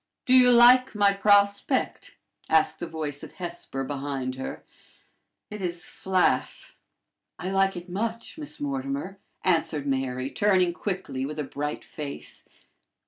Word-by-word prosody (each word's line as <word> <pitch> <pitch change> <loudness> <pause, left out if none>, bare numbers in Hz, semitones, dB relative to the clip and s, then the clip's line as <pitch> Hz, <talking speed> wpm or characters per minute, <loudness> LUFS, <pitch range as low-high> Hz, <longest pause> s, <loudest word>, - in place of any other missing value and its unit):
"Do 255 - +3
you 250 -1 +7
like 245 +1 +6
my 200 -1 +4
prospect?" 200 +5 +2 0.3
asked 160 -1 +3
the 175 - -4
voice 150 -3 -4
of - - -10
Hesper 170 -7 -5
behind 135 -2 -3
her. 130 +1 -6 0.9
"It 210 -1 -6
is 175 -1 -3
flat." 185 -1 0 0.7
"I 180 +3 -4
like 195 -1 +2
it 175 +1 -8
much, 225 +5 -4
Miss 300 -1 -6
Mortimer," 275 -7 -3 0.2
answered 160 -5 +1
Mary, 130 -1 -2
turning 185 -4 +2
quickly 180 -9 -4
with 150 +3 -5
a 150 - -1
bright 145 +2 -4
face. 145 -2 -7
185 Hz, 135 wpm, -26 LUFS, 145-210 Hz, 0.9 s, you